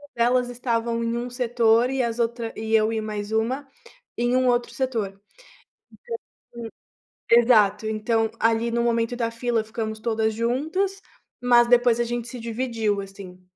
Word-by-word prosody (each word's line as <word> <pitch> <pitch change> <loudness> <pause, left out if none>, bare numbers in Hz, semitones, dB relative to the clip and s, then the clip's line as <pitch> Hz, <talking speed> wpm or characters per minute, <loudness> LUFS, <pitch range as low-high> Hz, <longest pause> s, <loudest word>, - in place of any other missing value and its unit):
elas 245 +1 +2
estavam 235 -1 -1
em 230 0 -1
um 240 +1 -4
setor 240 -1 +2
e 270 0 0
as 235 0 -3
outra 235 -1 -2
e 220 0 -4
eu 220 0 +3
e 220 - -1
mais 210 -1 -5
uma, 250 +6 -1 0.5
em 240 +1 +1
um 255 0 +2
outro 240 -1 +1
setor. 225 -7 -2 1.4
Então 235 -1 -6 0.6
exato, 220 -3 +5
então 220 +1 0
ali 225 +1 +2
no 235 0 0
momento 235 0 0
da 230 -1 -1
fila 230 -1 -1
ficamos 220 -1 -5
todas 220 -1 0
juntas 315 - -1 0.4
mas 240 -1 +5
depois 240 -1 +4
a - - +2
gente 240 0 -4
se 250 - -7
dividiu, 225 -3 -1
assim. 195 -2 -11
230 Hz, 155 wpm, -24 LUFS, 220-245 Hz, 1.4 s, exato